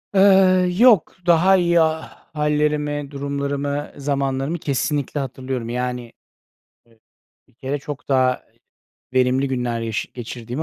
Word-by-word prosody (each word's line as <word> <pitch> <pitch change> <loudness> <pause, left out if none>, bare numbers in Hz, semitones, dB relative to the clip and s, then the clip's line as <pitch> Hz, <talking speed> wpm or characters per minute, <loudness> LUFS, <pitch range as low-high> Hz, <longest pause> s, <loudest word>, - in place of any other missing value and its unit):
Eee, 190 -2 +5
yok, 225 -6 +5
daha 175 +3 +5
iyi 170 -1 +3
ha 160 0 -1 0.2
hâllerimi, 150 -1 -1
durumlarımı, 140 0 -3
zamanlarımı 140 +2 -1
kesinlikle 145 -1 -2
hatırlıyorum. 130 -3 -4
Yani, 125 -1 -4 0.7
eee, 115 -1 -27 0.5
bir - - -29
kere 135 +4 -4
çok 145 -1 -8
daha 130 -2 +2 0.7
verimli 130 +1 +2
günler 125 -3 -2
yaşa 115 -1 -3
geçirdiğimi 120 +3 -6
140 Hz, 115 wpm, -21 LUFS, 130-155 Hz, 0.7 s, Eee